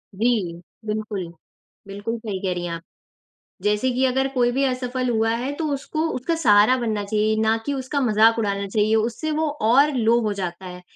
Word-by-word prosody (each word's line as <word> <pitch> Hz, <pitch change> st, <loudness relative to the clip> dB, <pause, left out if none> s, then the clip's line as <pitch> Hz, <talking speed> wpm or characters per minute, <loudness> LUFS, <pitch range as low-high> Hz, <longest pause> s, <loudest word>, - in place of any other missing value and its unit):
जी, 195 Hz, -7 st, 0 dB, 0.2 s
बिल्कुल, 210 Hz, -4 st, -3 dB, 0.6 s
बिल्कुल 205 Hz, +4 st, -4 dB
सही 210 Hz, -4 st, -5 dB
कह 185 Hz, -2 st, -1 dB
रही 175 Hz, 0 st, -4 dB
हैं 170 Hz, -, -4 dB
आप। 165 Hz, -, -6 dB, 0.8 s
जैसे 210 Hz, +5 st, +1 dB
कि 260 Hz, +2 st, +1 dB
अगर 265 Hz, +1 st, +1 dB
कोई 245 Hz, -1 st, +2 dB
भी 270 Hz, +2 st, 0 dB
असफल 255 Hz, 0 st, -2 dB
हुआ 225 Hz, -1 st, +1 dB
है, 255 Hz, +4 st, -3 dB
तो 320 Hz, -, -3 dB
उसको 310 Hz, +4 st, -2 dB
उसका 300 Hz, +7 st, -1 dB
सहारा 225 Hz, -3 st, +5 dB
बनना 220 Hz, -4 st, -2 dB
चाहिए 215 Hz, +1 st, 0 dB
ना 220 Hz, 0 st, +3 dB
कि 285 Hz, -, -1 dB
उसका 270 Hz, +2 st, -2 dB
मज़ाक 225 Hz, -1 st, +4 dB
उड़ाना 200 Hz, -2 st, -1 dB
चाहिए। 215 Hz, +2 st, +1 dB
उससे 235 Hz, +8 st, -1 dB
वो 310 Hz, +1 st, 0 dB, 0.2 s
और 280 Hz, +5 st, +5 dB
लो 230 Hz, +1 st, +3 dB
हो 215 Hz, -2 st, -1 dB
जाता 185 Hz, -1 st, -5 dB
है, 180 Hz, 0 st, -9 dB
225 Hz, 190 wpm, -22 LUFS, 205-255 Hz, 0.8 s, सहारा